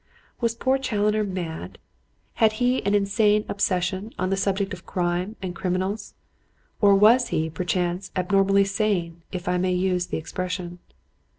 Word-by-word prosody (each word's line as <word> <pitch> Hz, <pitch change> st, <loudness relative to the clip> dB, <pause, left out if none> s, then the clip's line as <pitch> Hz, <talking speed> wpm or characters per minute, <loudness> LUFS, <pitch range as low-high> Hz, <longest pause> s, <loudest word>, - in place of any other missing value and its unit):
Was 230 Hz, -2 st, 0 dB
poor 260 Hz, +3 st, +1 dB
Challoner 215 Hz, -4 st, +1 dB
mad? 180 Hz, -5 st, -5 dB, 0.6 s
Had 220 Hz, -1 st, +5 dB
he 250 Hz, +3 st, +1 dB
an 200 Hz, -, +3 dB
insane 205 Hz, +1 st, +2 dB
obsession 190 Hz, +1 st, -1 dB
on 185 Hz, +1 st, -1 dB
the -, -, +3 dB
subject 195 Hz, 0 st, -1 dB
of 180 Hz, -1 st, -8 dB
crime 180 Hz, +3 st, -2 dB
and 180 Hz, -2 st, -4 dB
criminals? 190 Hz, +3 st, -2 dB, 0.7 s
Or 200 Hz, -2 st, +6 dB
was 230 Hz, +5 st, +5 dB
he, 160 Hz, 0 st, -1 dB
perchance, 180 Hz, +2 st, -2 dB
abnormally 195 Hz, +1 st, +3 dB
sane, 195 Hz, -5 st, -1 dB
if 180 Hz, -2 st, -6 dB
I 180 Hz, 0 st, +1 dB
may 185 Hz, 0 st, +1 dB
use 180 Hz, -1 st, 0 dB
the -, -, -3 dB
expression? 180 Hz, +2 st, -5 dB
195 Hz, 150 wpm, -24 LUFS, 180-210 Hz, 0.7 s, Or